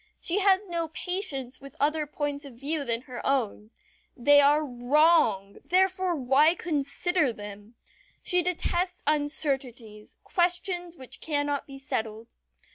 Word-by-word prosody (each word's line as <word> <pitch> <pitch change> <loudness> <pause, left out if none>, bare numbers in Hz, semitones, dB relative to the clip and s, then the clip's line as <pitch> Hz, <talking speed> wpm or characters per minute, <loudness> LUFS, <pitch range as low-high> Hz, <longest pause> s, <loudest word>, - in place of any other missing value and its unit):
She 355 +4 0
has 395 0 +3
no 340 -2 -2
patience 305 -7 -3
with 275 -1 -12
other 300 +1 +1
points 290 0 -3
of 275 -4 -11
view 285 +4 -2
than 230 -3 -2
her 250 -1 -8
own. 225 -6 -1 0.5
They 285 +3 +6
are 295 +2 +4
wrong 250 - +2
therefore 370 0 +2
why 285 +4 +4
consider 315 -1 0
them? 205 +1 -10 0.5
She 360 0 +2
detests 360 +1 -1
uncertainties 270 -7 -2
questions 350 -1 -1
which 260 - -7
cannot 290 -2 -1
be 275 -1 -10
settled. 225 -4 -5
290 Hz, 125 wpm, -27 LUFS, 250-345 Hz, 0.5 s, They